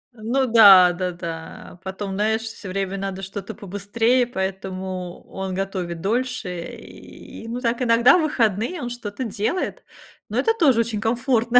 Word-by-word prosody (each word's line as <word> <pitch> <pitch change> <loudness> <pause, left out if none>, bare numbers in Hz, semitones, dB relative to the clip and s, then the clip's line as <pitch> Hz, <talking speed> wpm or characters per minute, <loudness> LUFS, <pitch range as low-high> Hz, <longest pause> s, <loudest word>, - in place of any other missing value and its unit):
Ну 240 +5 0
да 200 -6 +8
да 180 0 -2
да. 170 0 -8
Потом, 190 +1 -5
знаешь, 220 +2 +1
все 220 -3 -8
время 195 +1 -2
надо 195 0 -4
что-то 195 +2 -6
побыстрее, 225 +5 0
поэтому 190 -3 -4
он 190 -1 -5
готовит 185 -4 -3
дольше, 220 -6 -2
и, 225 - -12
ну, 240 +2 -4
так, 235 0 0
иногда 240 +5 +5
в - - +2
выходные 240 - 0
он 245 - -3
что-то 240 0 -5
делает, 235 - -2 0.5
но - - -3
это 450 - +3
тоже 275 - +4
очень 220 -2 -3
комфортно, 240 +1 +3
210 Hz, 150 wpm, -22 LUFS, 190-240 Hz, 0.5 s, да